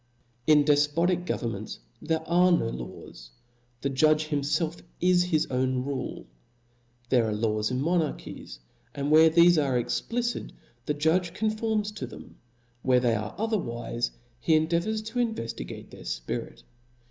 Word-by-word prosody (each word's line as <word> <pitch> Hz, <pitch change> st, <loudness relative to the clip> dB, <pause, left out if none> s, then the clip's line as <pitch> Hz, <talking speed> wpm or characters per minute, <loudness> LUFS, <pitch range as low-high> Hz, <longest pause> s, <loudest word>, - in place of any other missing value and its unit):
In 150 Hz, -1 st, +6 dB
dej^otic 160 Hz, +5 st, +2 dB
governments 110 Hz, -3 st, -3 dB, 0.2 s
there 160 Hz, 0 st, -2 dB
are 180 Hz, +2 st, +4 dB
no 140 Hz, -10 st, +2 dB
laws -, -, -9 dB, 0.3 s
\ 120 Hz, 0 st, -39 dB
the 140 Hz, -, +1 dB
judge 155 Hz, +3 st, +3 dB
himfelf 155 Hz, +3 st, -1 dB, 0.2 s
is 180 Hz, 0 st, +4 dB
his 160 Hz, -4 st, +1 dB
own 130 Hz, 0 st, 0 dB
rule. 140 Hz, -2 st, -4 dB, 0.8 s
There 120 Hz, -3 st, +3 dB
are 105 Hz, -, -1 dB
laws 105 Hz, 0 st, 0 dB
in 130 Hz, +1 st, -1 dB
monarchies; 165 Hz, -, -2 dB, 0.4 s
and 140 Hz, +1 st, -2 dB
where 160 Hz, +1 st, +8 dB
thefe 170 Hz, -1 st, +5 dB
are 130 Hz, -3 st, +1 dB
explicit, 240 Hz, -, -2 dB, 0.3 s
the 150 Hz, -, 0 dB
judge 170 Hz, +4 st, +1 dB
conforms 215 Hz, -1 st, 0 dB
to 210 Hz, -, -6 dB
them; -, -, -12 dB, 0.4 s
where 125 Hz, 0 st, +4 dB
they 120 Hz, -2 st, +2 dB
are 110 Hz, -1 st, -3 dB
otherwife, 120 Hz, -, -2 dB, 0.3 s
he 160 Hz, +5 st, +3 dB
endeavours 170 Hz, +8 st, +1 dB
to 225 Hz, +3 st, -4 dB
inycftigate 170 Hz, -, -4 dB
their -, -, -12 dB
fpirit. -, -, -5 dB
155 Hz, 140 wpm, -27 LUFS, 120-175 Hz, 0.8 s, where